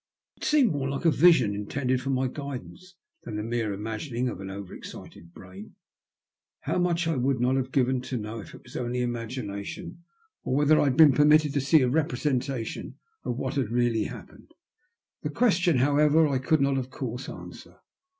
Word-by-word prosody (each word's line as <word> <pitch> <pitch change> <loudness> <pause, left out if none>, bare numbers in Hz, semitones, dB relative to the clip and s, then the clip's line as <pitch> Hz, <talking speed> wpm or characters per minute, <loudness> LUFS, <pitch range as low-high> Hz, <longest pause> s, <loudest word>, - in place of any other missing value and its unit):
It - - -13
seemed 300 -6 +4
more 140 -3 -2
like 140 +5 -4
a 165 - +6
vision 140 -9 +5
intended 125 +5 -1
for 135 - -4
my 130 -1 +1
guidance 140 - -8 0.3
than 110 - -7
the 105 - -3
mere 115 -1 -2
imagining 115 +5 -3
of 95 - -7
an 95 - -6
over 100 -1 -8
excited 85 0 -11
brain. 95 +4 -12 0.9
How - - -1
much 175 -1 +1
would 135 -4 +1
I - - -8
not 125 +2 +2
have 130 0 -2
given 130 -1 +1
to 130 0 -4
know 110 +1 -5
if - - -11
it - - -15
was - - -15
only 125 0 -2
imagination, 120 +3 -5 0.4
or 130 - -1
whether 150 +2 +4
I - - +3
had 135 -2 +1
been 155 -4 +8
permitted 150 +1 +4
to 140 - +1
see 140 +1 +4
a - - +2
representation 130 -3 -2 0.3
of 120 - -3
what 130 -1 -3
had 130 -6 0
really 120 -2 +1
happened? - - -10 0.7
This - - -4
question, 180 - +3
jhowever, 150 +4 +4
I 135 -3 0
could 155 +3 +1
not 140 -1 +2
of 130 0 -5
course 125 0 -5
answer. - - -11
130 Hz, 190 wpm, -27 LUFS, 120-150 Hz, 0.9 s, been